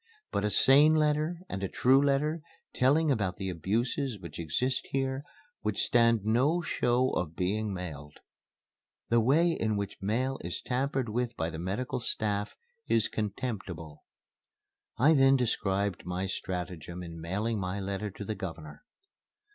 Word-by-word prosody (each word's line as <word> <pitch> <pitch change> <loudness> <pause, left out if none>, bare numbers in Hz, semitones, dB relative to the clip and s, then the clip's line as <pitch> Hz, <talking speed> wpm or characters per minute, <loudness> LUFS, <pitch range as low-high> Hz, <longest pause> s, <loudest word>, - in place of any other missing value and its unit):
But - - 0
a 105 - +2
sane 140 +9 +6
letter 155 +2 +1
and 95 - -5
a 95 - -1
true 130 +2 +4
letter, 150 +3 +1 0.3
telling 145 +4 +3
about 100 -8 0
the 95 -1 -3
abuses 110 - -1
which 85 -4 -9
exist 125 - -1
here 135 0 -1 0.4
would 105 -2 -2
stand 115 -3 +3
no 130 +10 +3
show 125 -3 +1
of 85 -2 -2
being 105 +3 -1
mailed. 80 -6 -7 0.9
The 115 - +4
way 150 +9 +4
in 110 -9 0
which 100 -1 -5
mail 125 +7 0
is 85 +1 -4
tampered 135 0 -1
with 120 +2 -2
by 80 +1 -1
the 80 - -6
medical 100 +9 -2
staff 105 -3 -2 0.3
is 110 -2 +3
contemptible." 100 -8 -5 0.9
I 150 +7 +5
then 135 -2 +6
described 100 -6 0
my 90 +1 -2
stratagem 90 -2 -5
in 85 -1 -8
mailing 105 +6 -1
my 95 +1 -3
letter 100 +2 -3
to 100 +1 -8
the 110 - -2
Governor. 85 - -7
105 Hz, 145 wpm, -30 LUFS, 95-130 Hz, 0.9 s, sane